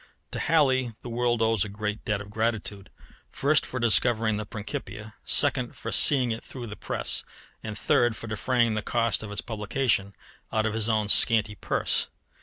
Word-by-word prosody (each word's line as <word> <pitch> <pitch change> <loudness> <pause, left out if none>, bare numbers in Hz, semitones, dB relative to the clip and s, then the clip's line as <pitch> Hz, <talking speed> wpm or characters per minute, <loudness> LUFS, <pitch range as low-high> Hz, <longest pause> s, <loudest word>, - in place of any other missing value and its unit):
To - - -4
Halley 130 -7 +2
the 120 - -7
world 120 -1 0
owes 110 -4 +2
a 105 - -6
great 105 +1 -4
debt 105 -1 -1
of 100 0 -11
gratitude 110 -3 -2 0.4
first, 145 +2 +1
for 125 - -5
discovering 115 -1 +2
the 105 -1 -5
Principia; 105 0 -7
second, - - +3
for - - -6
seeing 130 -5 +4
it 115 - -5
through 125 -3 -8
the 105 -2 -8
press; - - -2 0.4
and 110 -1 -6
third, 120 +2 +2
for 115 - -8
defraying 115 +1 0
the 110 - -2
cost 115 -1 0
of 110 -1 -7
its 105 - +1
publication 105 -2 -1 0.4
out 110 0 0
of 110 - -1
his 110 0 0
own 110 -2 +1
scanty 110 0 +5
purse. 105 - -1
110 Hz, 180 wpm, -26 LUFS, 105-120 Hz, 0.4 s, scanty